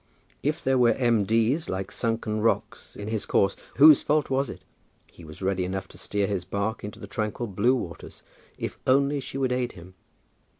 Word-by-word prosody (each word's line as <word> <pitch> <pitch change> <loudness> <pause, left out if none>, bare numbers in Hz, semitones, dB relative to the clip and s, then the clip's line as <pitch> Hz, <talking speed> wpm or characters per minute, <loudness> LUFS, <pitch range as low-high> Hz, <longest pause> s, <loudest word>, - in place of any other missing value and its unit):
If 150 +2 -1
there 130 -1 +2
were 120 -1 +5
M. 115 -5 +2
D.'s, 115 +9 +1
like 95 0 -3
sunken 115 -2 -1
rocks, 115 - -1
in 105 - -7
his 110 -1 -3
course, 100 0 +2 0.2
whose 150 0 +8
fault 150 -2 +1
was 135 +1 +1
it? - - -9 0.5
He 85 - -15
was 80 +4 -10
ready 95 -1 0
enough 95 +1 -3
to - - -14
steer 100 -1 -1
his 100 -3 -2
bark 100 +4 -3
into 105 +1 -7
the - - -7
tranquil 115 -2 -3
blue 120 +5 +2
waters, 85 -9 -7 0.3
if - - -5
only 140 +2 +3
she 135 0 -6
would 130 -2 0
aid 125 -1 -1
him. 90 +1 -13
115 Hz, 195 wpm, -26 LUFS, 100-130 Hz, 0.5 s, whose